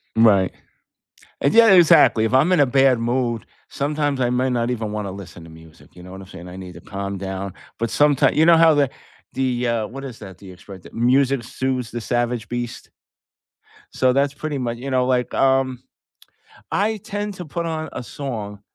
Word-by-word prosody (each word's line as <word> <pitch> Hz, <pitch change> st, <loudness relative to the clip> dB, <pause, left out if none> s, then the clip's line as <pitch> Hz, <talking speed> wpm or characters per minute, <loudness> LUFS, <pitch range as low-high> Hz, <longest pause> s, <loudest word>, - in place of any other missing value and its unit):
Right. 105 Hz, -5 st, +4 dB, 0.9 s
And, 140 Hz, -, +2 dB
yeah, 230 Hz, -2 st, +7 dB
exactly, 160 Hz, -10 st, +6 dB
if 110 Hz, -, -2 dB
I'm 145 Hz, +8 st, +4 dB
in 180 Hz, -, +3 dB
a -, -, +5 dB
bad 135 Hz, 0 st, +3 dB
mood, 120 Hz, 0 st, -1 dB, 0.2 s
sometimes 145 Hz, -1 st, -1 dB
I 120 Hz, -, +2 dB
may 125 Hz, +1 st, 0 dB
not 120 Hz, -1 st, 0 dB
even 110 Hz, -3 st, -3 dB
wanna 105 Hz, -2 st, -4 dB
listen 90 Hz, -3 st, -10 dB
to 85 Hz, -, -13 dB
music, 80 Hz, 0 st, -17 dB
you 90 Hz, -, -13 dB
know 90 Hz, -, -11 dB
what 95 Hz, +1 st, -9 dB
I'm 95 Hz, -, -12 dB
saying? 90 Hz, -2 st, -11 dB
I 90 Hz, -, -10 dB
need 95 Hz, -1 st, -9 dB
to -, -, -11 dB
calm 100 Hz, 0 st, -5 dB
down, 95 Hz, 0 st, -5 dB, 0.2 s
but 115 Hz, 0 st, -2 dB
sometime 145 Hz, +1 st, +3 dB
you 155 Hz, -, +3 dB
know 170 Hz, 0 st, +6 dB
how 165 Hz, -1 st, +6 dB
the 145 Hz, -3 st, +2 dB, 0.4 s
the, 125 Hz, -2 st, -1 dB
uh, 115 Hz, -2 st, -1 dB
what 135 Hz, +3 st, -8 dB
is 125 Hz, -4 st, -9 dB
that, 95 Hz, -4 st, -11 dB
the 95 Hz, 0 st, -13 dB
expression? 95 Hz, 0 st, -12 dB
The -, -, -14 dB
"music 130 Hz, +2 st, +2 dB
soothes 125 Hz, -1 st, -3 dB
the 120 Hz, -, -4 dB
savage 120 Hz, -1 st, -2 dB
beast?" 120 Hz, 0 st, -5 dB, 1.0 s
So 130 Hz, -1 st, +2 dB
that's 140 Hz, +1 st, +1 dB
pretty 150 Hz, +1 st, -4 dB
mu 125 Hz, -3 st, -2 dB
you 120 Hz, +4 st, -6 dB
know, 130 Hz, -1 st, +1 dB
like, 125 Hz, -1 st, 0 dB
um, 130 Hz, -1 st, +1 dB, 0.9 s
I 215 Hz, +2 st, 0 dB
tend 205 Hz, +1 st, -5 dB
to 180 Hz, -2 st, -8 dB
put 170 Hz, +3 st, -4 dB
on 160 Hz, -1 st, -4 dB
a 125 Hz, -, -5 dB
song 110 Hz, -7 st, -6 dB
125 Hz, 200 wpm, -21 LUFS, 105-140 Hz, 1.0 s, yeah